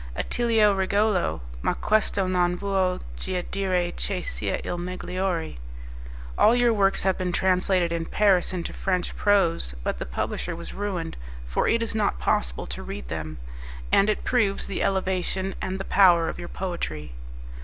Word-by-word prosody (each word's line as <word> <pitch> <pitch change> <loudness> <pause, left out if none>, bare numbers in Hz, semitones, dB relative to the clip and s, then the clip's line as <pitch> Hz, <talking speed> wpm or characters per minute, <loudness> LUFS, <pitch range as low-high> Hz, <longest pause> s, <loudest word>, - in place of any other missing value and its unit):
"'Attilio 225 - +2
Regolo; 195 - +1 0.2
ma - - 0
questo 210 -2 +1
non 180 -1 +1
vuol 190 -2 0 0.2
gia 180 - -3
dire 185 -3 0
che 185 -3 -2
sia - - -2
il - - -3
megliore'." 180 - -3 0.8
"All 230 - +6
your 240 -1 +4
works 195 -2 +2
have 190 -1 +1
been 180 -1 -1
translated 185 -1 +2
in 165 -1 -2
Paris 195 -4 +3
into 180 -2 -4
French 185 -2 -1
prose, 170 - +2
but - - -2
the - - -3
publisher 115 - -3
was 170 - -7
ruined, 190 -5 -3 0.3
for - - 0
it 230 0 +2
is 230 - -2
not 215 -2 +1
possible 60 0 0
to - - -5
read 65 -3 -7
them, 80 -1 -5 0.5
and 200 - +5
it 215 - 0
proves 215 -6 +1
the 195 - -3
elevation 190 0 0
and 190 0 -3
the 195 - -4
power 175 -4 +5
of - - -6
your 175 - -6
poetry." 80 - -4
185 Hz, 160 wpm, -25 LUFS, 175-200 Hz, 0.8 s, All